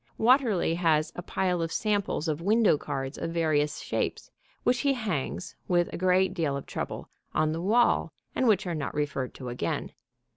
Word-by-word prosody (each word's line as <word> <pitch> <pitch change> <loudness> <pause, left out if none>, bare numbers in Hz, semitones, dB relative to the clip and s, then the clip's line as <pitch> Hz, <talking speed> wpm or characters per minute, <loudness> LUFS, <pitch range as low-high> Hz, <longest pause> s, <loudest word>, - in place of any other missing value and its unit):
Watterly 230 - +3
has 160 -3 +2
a - - -4
pile 180 -1 -1
of 165 0 -2
samples 205 -6 0
of 155 0 -1
window 215 0 +4
cards 135 -1 -4
of - - -2
various 155 -3 +1
shapes, - - -3 0.3
which 245 -1 +2
he 280 -1 +2
hangs, 195 - -3
with 175 -1 +1
a - - -3
great 185 +1 +3
deal 155 -6 0
of 140 - -7
trouble, - - -5 0.3
on 155 0 +2
the 165 +1 -3
wall, 230 +6 +3 0.2
and 260 - +1
which 215 -2 +3
are 175 - -2
not 145 -5 -3
referred 140 -3 -2
to 125 -2 -6
again. 120 -9 -3
170 Hz, 180 wpm, -28 LUFS, 150-205 Hz, 0.3 s, window